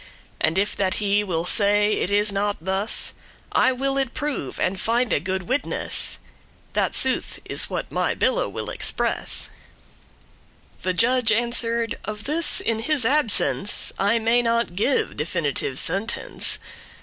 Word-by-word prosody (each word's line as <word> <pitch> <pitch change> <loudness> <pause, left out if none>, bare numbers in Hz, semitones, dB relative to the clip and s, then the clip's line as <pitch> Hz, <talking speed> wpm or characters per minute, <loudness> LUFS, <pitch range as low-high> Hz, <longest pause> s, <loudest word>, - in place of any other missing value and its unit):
And 160 +2 +1
if 205 +2 0
that 190 -2 +1
he 205 0 +1
will 170 -4 -2
say 205 +2 +2
it - - -1
is 205 +1 +2
not 200 +1 -1
thus, 190 +5 +1 0.4
I 260 - +3
will 270 +2 -1
it 265 -3 -2
prove, 290 - -4
and 185 +1 -1
finde 230 - 0
good 190 0 -2
witness, 260 +9 -1 0.6
That - - 0
sooth - - 0
is - - +1
what - - -4
my - - 0
bille - - 0
will - - -5
express." - - -1 1.3
The 185 -1 -1
judge 235 +1 +3
answer'd, 235 0 +1
"Of 210 -1 -6
this, 310 +5 +2
in 225 -1 -1
his 270 +1 +1
absence, 230 -6 +3
I 205 +4 +2
may 230 +2 +2
not 230 -5 0
give 255 +8 +1
definitive 150 -4 -2
sentence. 195 +10 0
215 Hz, 140 wpm, -23 LUFS, 195-245 Hz, 1.3 s, I